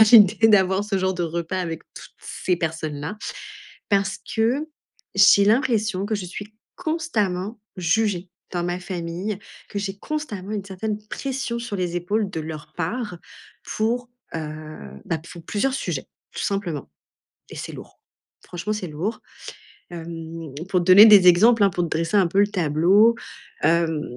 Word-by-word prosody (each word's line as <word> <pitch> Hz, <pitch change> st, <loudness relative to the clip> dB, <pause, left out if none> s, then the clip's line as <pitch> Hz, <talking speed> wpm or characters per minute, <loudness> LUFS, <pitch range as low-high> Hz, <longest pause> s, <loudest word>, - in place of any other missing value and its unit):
à -, -, +10 dB
l'idée 225 Hz, 0 st, +7 dB
d'avoir 190 Hz, -1 st, +4 dB
ce 205 Hz, -2 st, -1 dB
genre 190 Hz, 0 st, +1 dB
de 175 Hz, -, -2 dB
repas 170 Hz, +2 st, -2 dB
avec 165 Hz, -2 st, -4 dB
toutes -, -, -12 dB
ces 180 Hz, -1 st, -2 dB
personnes-là. 160 Hz, +2 st, -4 dB, 0.7 s
Parce 195 Hz, -1 st, +1 dB, 0.2 s
que 250 Hz, +8 st, +1 dB, 0.5 s
j'ai 200 Hz, -, +7 dB
l'impression 215 Hz, -4 st, +2 dB
que 215 Hz, +1 st, -1 dB
je 200 Hz, -3 st, -4 dB
suis 205 Hz, +4 st, -8 dB, 0.2 s
constamment 225 Hz, -, -1 dB, 0.2 s
jugée 185 Hz, +1 st, +1 dB, 0.2 s
dans 175 Hz, -1 st, -1 dB
ma 175 Hz, +1 st, -2 dB
famille, 180 Hz, +3 st, -4 dB, 0.3 s
que 200 Hz, -, -3 dB
j'ai 200 Hz, -1 st, -4 dB
constamment 210 Hz, -8 st, -5 dB
une 205 Hz, -2 st, -2 dB
certaine 205 Hz, +2 st, -4 dB
pression 265 Hz, -3 st, -3 dB
sur 235 Hz, -3 st, -4 dB
les 175 Hz, -2 st, -1 dB
épaules 200 Hz, +4 st, -1 dB
de 165 Hz, -, -4 dB
leur 155 Hz, -1 st, -7 dB
part 180 Hz, +2 st, -3 dB, 0.6 s
pour, 240 Hz, +3 st, 0 dB, 0.3 s
heu, -, -, -1 dB, 0.7 s
bah, 165 Hz, -, -1 dB
pour 170 Hz, -2 st, -10 dB
plusieurs 260 Hz, +9 st, 0 dB
sujets, -, -, -3 dB, 0.3 s
tout -, -, -4 dB
simplement. 190 Hz, -7 st, -2 dB, 0.6 s
Et -, -, -10 dB
c'est -, -, -6 dB
lourd, -, -, -12 dB, 0.4 s
franchement, 180 Hz, +5 st, -4 dB
c'est 200 Hz, -4 st, -4 dB
lourd. 170 Hz, +9 st, -4 dB, 0.7 s
Hem, 165 Hz, -2 st, -7 dB, 0.2 s
pour 185 Hz, -, +2 dB
te -, -, -4 dB
donner 190 Hz, +4 st, +10 dB
des 205 Hz, -4 st, +8 dB
exemples, 220 Hz, +6 st, +6 dB
hein, 200 Hz, -, +5 dB
pour 175 Hz, -1 st, -1 dB
te 170 Hz, -, -2 dB
dresser 165 Hz, +6 st, 0 dB
un 195 Hz, -, +5 dB
peu 195 Hz, +4 st, +1 dB
le 205 Hz, -, +5 dB
tableau, 185 Hz, +5 st, +4 dB, 0.5 s
hem. 165 Hz, -2 st, +2 dB
195 Hz, 160 wpm, -23 LUFS, 170-215 Hz, 0.7 s, à